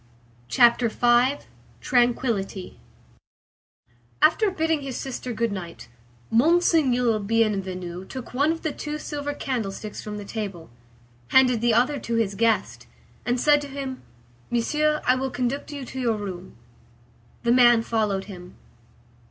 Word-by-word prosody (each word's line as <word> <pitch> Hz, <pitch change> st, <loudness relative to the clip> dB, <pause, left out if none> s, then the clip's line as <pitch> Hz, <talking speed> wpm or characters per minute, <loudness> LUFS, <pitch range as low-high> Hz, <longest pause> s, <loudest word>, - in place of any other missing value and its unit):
CHAPTER 235 Hz, -, +4 dB
V—TRANQUILLITY 240 Hz, -4 st, 0 dB, 1.4 s
After 420 Hz, +6 st, +4 dB
bidding 320 Hz, -4 st, 0 dB
his 270 Hz, -2 st, -5 dB
sister 255 Hz, -1 st, -5 dB
good 230 Hz, -1 st, -1 dB
night, 175 Hz, -8 st, -7 dB, 0.4 s
Monseigneur 255 Hz, -4 st, +3 dB
Bienvenu 190 Hz, -4 st, -1 dB
took 260 Hz, -2 st, -8 dB
one 285 Hz, +5 st, +2 dB
of 330 Hz, -, -5 dB
the 315 Hz, -, -1 dB
two 300 Hz, 0 st, -5 dB
silver 290 Hz, -1 st, -5 dB
candlesticks 215 Hz, -6 st, -4 dB
from 210 Hz, -1 st, -6 dB
the 205 Hz, -, -7 dB
table, 195 Hz, -, -6 dB, 0.6 s
handed 250 Hz, -, +4 dB
the 235 Hz, -2 st, +3 dB
other 260 Hz, +5 st, +2 dB
to 230 Hz, -, -3 dB
his 220 Hz, -3 st, 0 dB
guest, 225 Hz, +2 st, 0 dB, 0.4 s
and 245 Hz, +1 st, +1 dB
said 295 Hz, +2 st, +4 dB
to 290 Hz, -, -6 dB
him,— 270 Hz, -2 st, -6 dB, 0.5 s
"Monsieur, 300 Hz, +6 st, 0 dB
I 250 Hz, -, +5 dB
will 265 Hz, +1 st, -2 dB
conduct 255 Hz, +4 st, -3 dB
you 285 Hz, -3 st, -6 dB
to 260 Hz, -, -7 dB
your 230 Hz, -4 st, 0 dB
room." 190 Hz, -3 st, -7 dB, 0.9 s
The 235 Hz, -, +2 dB
man 240 Hz, -2 st, +6 dB
followed 215 Hz, -4 st, -1 dB
him. 180 Hz, -3 st, -11 dB
240 Hz, 130 wpm, -24 LUFS, 210-275 Hz, 1.4 s, man